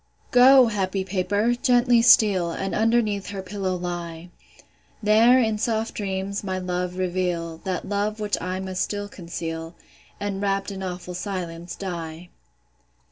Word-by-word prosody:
Go, 255 +1 +8
happy 195 -3 -1
paper, 200 +4 0
gently 245 -2 +3
steal, 205 -7 +5
And 195 +3 -3
underneath 220 -3 +1
her 195 -2 -5
pillow 190 -1 -3
lie; 175 -1 -5 0.7
There, 225 +4 +6
in 220 -3 +1
soft 225 0 -1
dreams, 195 0 -3
my 190 -1 -2
love 180 0 -3
reveal, 175 -3 -2
That 185 -2 -3
love 205 +2 -1
which 210 -1 0
I 185 +2 -3
must 190 -1 -3
still 205 0 -2
conceal, 165 -3 -6 0.4
And, 200 -1 -3
wrapt 195 0 -1
in 195 -1 -6
awful 180 -1 -5
silence, 175 -2 -5
die. 170 -2 -6
190 Hz, 135 wpm, -24 LUFS, 180-210 Hz, 0.7 s, Go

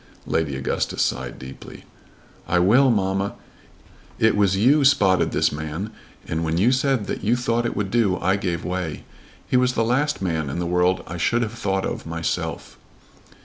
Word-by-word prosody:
Lady 80 -4 -1
Augustus 65 0 -1
sighed 65 -1 -3
deeply. 65 +1 -11 0.6
"I 90 - +2
will, 115 +10 +5
mamma. 95 -2 0 0.8
It 110 - +3
was 100 -2 +2
you 135 +8 +4
spotted 100 -10 +3
this - - +2
man, 80 +7 -5 0.4
and 80 +1 -2
when 80 0 -1
you 110 +8 +4
said 130 -4 +1
that - - -4
you 110 +4 +3
thought 120 -1 0
it - - -4
would 100 -2 -2
do, 110 -6 +2
I 95 +3 +1
gave 90 -4 -3
way. 90 -3 -3 0.4
He 125 - +2
was 125 0 +2
the 115 - +1
last 145 +6 +1
man 80 -6 -2
in 65 - -4
the 85 - -2
world 90 +1 +1
I 85 - -6
should 120 +8 +1
have 110 -1 -4
thought 95 -4 -1
of - - -5
myself." 80 0 -4
95 Hz, 180 wpm, -23 LUFS, 85-120 Hz, 0.8 s, will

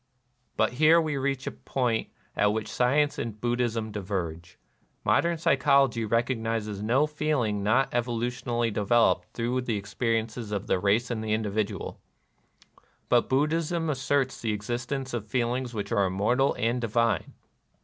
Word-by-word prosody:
But - - +2
here 155 +5 +5
we 155 -3 -1
reach 135 0 -1
a - - -2
point 120 -4 -1 0.3
at 105 0 +3
which 110 0 -2
science 145 +4 +2
and 110 -2 -4
Buddhism 120 -2 -1
diverge. 90 -5 -4 0.5
Modern 170 0 +2
psychology 135 -5 +3
recognizes 115 -2 -1
no 125 +7 +3
feelings 145 -9 -1
not 120 +6 +2
evolutionally 120 -1 -1
devel 115 +3 +4
oped - - -4
through 125 +2 -1
the 115 -4 -2
experiences 115 +2 -2
of 100 -1 -2
the 95 - +1
race 105 +6 +1
and 110 -2 -2
the 110 -1 -1
individual; 110 -1 -2 1.1
but - - +3
Buddhism 160 +4 +1
asserts 135 -1 0
the 110 -2 0
existence 120 +5 -3
of 110 -3 -3
feelings 125 +1 -1
which 105 -2 -5
are 100 -4 +3
immortal 110 +9 +1
and 120 +2 0
234 115 0 +1
NIRVANA 115 -5 +3
divine. - - -18
120 Hz, 150 wpm, -27 LUFS, 110-130 Hz, 1.1 s, here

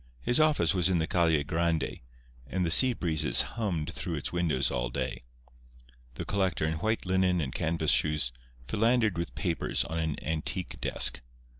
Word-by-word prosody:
His 120 - +2
office 155 -6 +3
was 90 -1 +2
in 90 - +2
the 80 - 0
Calle 80 -4 +2
Grande, 80 +2 -1 0.5
and 90 +5 -1
the 80 - 0
sea 130 +8 +6
breezes 80 -8 +1
hummed 95 -10 -3
through - - -4
its - - -4
windows 85 -6 0
all - - -2
day. - - -4 0.9
The - - -5
collector, 95 -5 0
in 80 0 -2
white 110 +4 -1
linen 95 -1 +1
and 70 -5 -3
canvas 80 -1 0
shoes, 75 -5 +2 0.4
philandered 110 - +1
with 85 0 -4
papers 85 -4 -1
on 80 +1 -4
an 80 -2 -1
antique 80 +3 -4
desk. - - +4
85 Hz, 165 wpm, -28 LUFS, 80-95 Hz, 0.9 s, sea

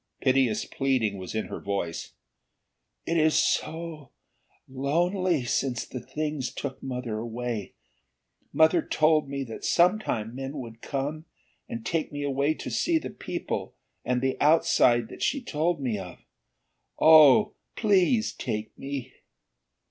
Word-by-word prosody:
Piteous 130 -4 +2
pleading 125 -8 0
was 95 +3 -7
in 110 - -1
her - - -6
voice. 100 -4 -4 0.9
"It 165 - 0
is 155 -1 +3
so 160 -4 -1 0.6
lonely 165 +4 0
since 125 -1 -1
the 125 - -6
Things 150 -2 -3
took 135 -2 -6
Mother 125 -4 -4
away. 115 -2 -4 0.8
Mother 160 +2 +4
told 155 -2 +2
me 140 0 -3
that 115 -4 -8
sometime 170 - +2
men 135 +3 -5
would 115 -3 -8
come, 145 +3 -3 0.4
and 115 -1 -6
take 165 +3 -1
me 145 0 -4
away 140 +2 +1
to - - -6
see 335 -1 +2
the - - -5
people - - -5 0.3
and 125 0 0
the 130 0 -1
outside 125 -6 +4
that - - -11
she 285 - +1
told 170 - -1
me 120 -7 -2
of. 90 -2 -8 0.8
Oh, 160 +6 +7 0.2
please 215 +2 +2
take 105 0 -4
me!" 135 -2 -5
140 Hz, 135 wpm, -27 LUFS, 120-160 Hz, 0.9 s, Oh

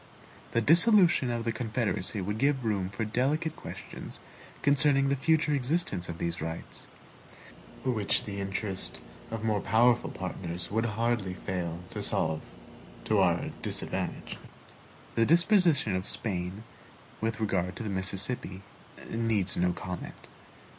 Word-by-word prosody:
The 115 - +3
dissolution 175 - +6
of 120 -1 -1
the 115 - 0
Confederacy 110 -3 -1
would 105 +3 -3
give 135 -2 +2
room 100 -4 0
for 100 +3 -3
delicate 145 +8 0
questions - - -8 0.4
concerning 140 -1 +4
the 140 - +2
future 155 +2 +2
existence 130 - -1
of 85 - -5
these 85 0 -2
rights; 80 +1 -6 1.0
which 110 -6 +2
the 100 -1 -5
interest 95 - -2 0.3
of 115 -1 -5
more 105 -3 +1
powerful 120 +4 +3
partners 90 -2 -5
would 115 +2 +1
hardly 115 -5 0
fail 90 -3 -4
to - - -4
solve 80 -1 0 0.6
to 110 -2 +3
our 85 -3 +2
disadvantage. - - -3 0.8
The 115 - +3
disposition 170 - +4
of 95 +1 -2
Spain 95 0 -1 0.6
with 110 0 -1
regard 95 -4 0
to 115 - -5
the 110 - -3
Mississippi 95 +1 -1 0.5
needs 110 -4 +1
no 90 0 +2
comment. 90 0 -7
110 Hz, 130 wpm, -29 LUFS, 95-130 Hz, 1.0 s, dissolution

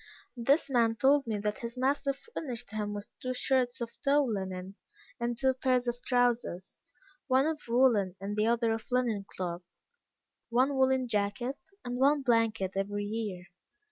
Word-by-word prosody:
This 270 +6 +2
man 235 -4 +2
told 270 +3 +3
me 220 -2 -1
that 210 +1 -2
his 235 +1 -6
master 275 +2 +1
furnished 270 - -7
him 210 -1 -2
with 205 0 -6
two 255 0 -2
shirts 255 -1 +1
of 235 0 -6
tow 285 +1 +4
linen, 190 -5 -3 0.5
and 235 0 -1
two 265 +1 +2
pair 255 0 +1
of 245 -1 -1
trowsers, 240 -7 0 0.5
one 260 +1 +4
of 315 -1 -1
woollen 230 -6 +3
and 200 +2 -4
the 215 +1 +2
other 230 -1 +2
of 225 0 -5
linen 230 -6 0
cloth, 175 -1 -3 0.9
one 260 +4 +2
woollen 260 -1 +3
jacket, 215 +5 -1 0.3
and 245 0 -3
one 285 +1 +4
blanket 225 -6 +2
every 205 +1 -1
year. 205 -4 -4
235 Hz, 160 wpm, -30 LUFS, 210-260 Hz, 0.9 s, tow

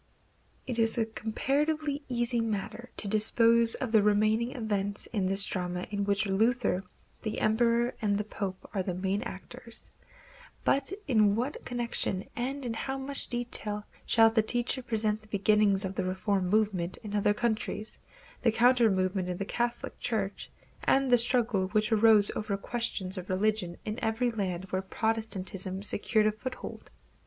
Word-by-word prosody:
It 245 -3 -3
is 225 +2 +1
a 225 - +2
comparatively 285 +7 -1
easy 240 -1 0
matter 225 +2 -4
to 210 - -3
dispose 230 +2 +7
of 255 -4 -4
the 220 -2 +5
remaining 215 +3 +2
events 205 -4 -3
in 195 -4 0
this 195 +1 +5
drama 180 -2 -3
in 200 -1 -1
which 200 +1 +1
Luther, 205 -1 +1 0.4
the 215 - -3
Emperor 235 +2 +2
and 205 -2 +1
the 210 - -1
Pope 200 -3 -6
are 195 - 0
the 185 -1 -3
main 190 +2 -1
actors; 230 +1 -4 0.7
but 275 +4 +1 0.2
in 215 -6 +3
what 250 +6 -3
connection, 235 -5 -2
and 265 +3 -3
in 235 - -2
how 265 +4 -3
much 275 +1 -3
detail, 225 -4 -4 0.2
shall 225 -1 +4
the 225 0 +3
teacher 245 +4 0
present 220 -3 +2
the 215 - -20
beginnings 205 -1 +3
of 190 - -4
the - - -2
reform 185 +1 -1
movement 195 -3 0
in 210 -1 -5
other 205 0 +2
countries, 220 -1 -2 0.4
the 230 - +3
counter 240 0 +4
movement 185 -1 -1
in 180 - -3
the 195 - -3
Catholic 240 +3 -3
Church, 205 -4 -3 0.3
and 270 -1 +2
the - - +8
struggles 225 -5 0
which 215 +2 +2
arose 215 -2 +5
over 210 -2 -2
questions 195 -4 -3
of 180 - -10
religion 190 -2 0
in 215 +1 -4
every 230 +2 0
land 190 -5 -3
where 185 - 0
Protestantism 195 -3 -3
secured 215 +1 +1
a 215 - +3
foothold? 240 +5 -8
215 Hz, 160 wpm, -29 LUFS, 200-235 Hz, 0.7 s, the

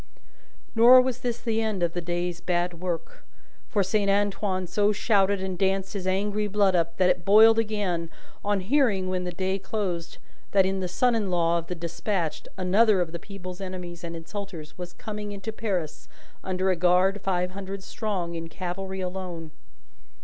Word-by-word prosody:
Nor 240 +3 +8
was 255 -1 +1
this 240 -1 -2
the 225 -2 0
end 215 -5 -1
of 170 -1 +1
the 175 - -2
day's 175 0 -2
bad 175 -1 -1
work, 185 - -4 0.5
for 205 -2 +2
Saint 200 +1 +1
Antoine 195 -2 +1
so 205 +4 +2
shouted 200 -2 +2
and 185 -2 -4
danced 195 0 +1
his 190 -2 -4
angry 205 +2 0
blood 200 -2 +3
up, 170 -1 0
that 185 -1 +5
it 175 - -2
boiled 220 +4 +7
again, 200 -7 -1 0.3
on 205 -1 +1
hearing 205 -4 +2
when 185 -1 -1
the 180 - -3
day 190 +2 -1
closed 185 -5 -3 0.4
in 190 0 +3
that - - -3
the 185 - -1
son 245 +7 +2
in 215 -4 0
law 170 -1 +2
of 165 - -9
the 180 - -4
despatched, 170 0 -3
another 195 +3 +4
of 175 -2 -1
the 170 - -5
people's 185 0 -8
enemies 180 -2 -6
and 170 0 -5
insulters, 165 -2 -7
was 175 -1 -7
coming 210 +1 -6
into 200 +2 -5
Paris 190 -9 -3 0.3
under 185 0 0
a - - +2
guard 180 +3 +3
five 180 -2 0
hundred 195 0 -6
strong, 190 -7 -3
in 165 0 -5
cavalry 190 +2 -4
alone. 180 -3 -5
190 Hz, 180 wpm, -26 LUFS, 175-205 Hz, 0.5 s, Nor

